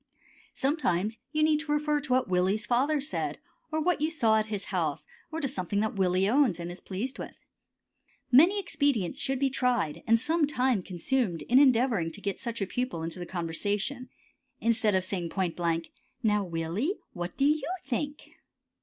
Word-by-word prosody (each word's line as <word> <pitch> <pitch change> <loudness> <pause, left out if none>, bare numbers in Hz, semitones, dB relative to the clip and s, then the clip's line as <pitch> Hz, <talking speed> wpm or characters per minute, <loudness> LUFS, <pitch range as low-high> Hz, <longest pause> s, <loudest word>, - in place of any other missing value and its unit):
Sometimes 235 - 0
you 305 0 +1
need 310 -1 +4
to 305 -1 -4
refer 295 0 +1
to 285 - -6
what 255 -1 +2
Willie's 185 +4 +1
father 275 +5 +2
said, 285 +2 -3 0.3
or 315 - 0
what 330 -1 +1
you 310 - +2
saw 230 -9 +3
at 215 - -2
his 205 -2 -3
house, 160 -5 -1 0.3
or 320 - -3
to 285 - 0
something 200 - -2
that 220 - -1
Willie 185 -1 +2
owns 245 - +3
and 170 0 -5
is 175 - -7
pleased 220 +8 -4
with. - - -7 1.0
Many 340 +11 +6
expedients 275 - 0
should 270 -1 0
be 270 0 +1
tried 245 - 0
and 230 0 +5
some 310 +4 +2
time 255 -6 +1
consumed 180 - -1
in 250 - +5
endeavoring 240 - +3
to - - -7
get 200 -1 -3
such 235 -4 -3
a - - 0
pupil 225 -6 -3
into 165 +2 -5
the 175 - -6
conversation 205 +9 -2 0.5
instead 225 -3 +2
of 185 - +2
saying 180 -3 -3
point 180 -2 -1
blank, 165 -1 -1 0.3
"Now, 210 -2 +2
Willie, 180 - -2 0.2
what 175 0 -5
do 275 - +3
you 300 +1 +2 0.2
think?" 290 +3 -4
230 Hz, 180 wpm, -29 LUFS, 185-280 Hz, 1.0 s, Many